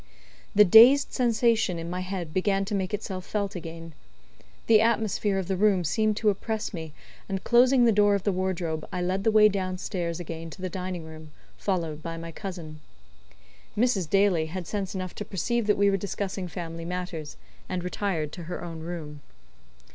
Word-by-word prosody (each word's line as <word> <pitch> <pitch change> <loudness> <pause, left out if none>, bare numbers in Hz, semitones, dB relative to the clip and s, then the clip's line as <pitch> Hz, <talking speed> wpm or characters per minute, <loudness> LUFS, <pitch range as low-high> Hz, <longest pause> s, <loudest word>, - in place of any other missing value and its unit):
The 210 +1 +8
dazed 240 +9 +7
sensation 230 -6 +2
in 165 0 -5
my 180 +1 -3
head 185 -4 -5
began 195 +1 +1
to 210 - -5
make 190 -1 -1
itself 195 -3 -4
felt 200 0 -2
again. 165 -1 -8 0.7
The 220 -1 +6
atmosphere 220 -3 +1
of 190 -2 -2
the 190 - 0
room 195 -2 +3
seemed 215 +7 +1
to 215 -2 +3
oppress 215 +2 -4
me, 160 -3 -6 0.4
and 195 -1 -3
closing 250 +1 +5
the 230 - +5
door 205 -1 +4
of 200 - -2
the 205 - +1
wardrobe, 180 -4 -2
I 180 - -3
led 190 +2 -1
the 225 - +3
way 215 -1 +7
down 185 -2 -2
stairs 175 -3 -3
again 165 -1 -6
to 185 - -11
the 185 - -2
dining 180 -2 -4
room, 160 -1 -11 0.3
followed 165 -6 -2
by 165 +1 -5
my 165 0 -7
cousin. 165 -4 -7 1.0
Mrs. 210 -8 +1
Daly 195 -5 +3
had 175 +2 -5
sense 195 +1 -4
enough 185 -1 -4
to - - -5
perceive 215 +4 -1
that 210 - +3
we 200 0 +4
were 195 - +1
discussing 195 -1 -4
family 165 0 -6
matters, 175 -3 -5 0.3
and 185 -1 -2
retired 180 -5 -2
to 175 -1 -8
her 175 - -6
own 165 -2 -6
room. 160 -3 -7
185 Hz, 185 wpm, -27 LUFS, 170-205 Hz, 1.0 s, The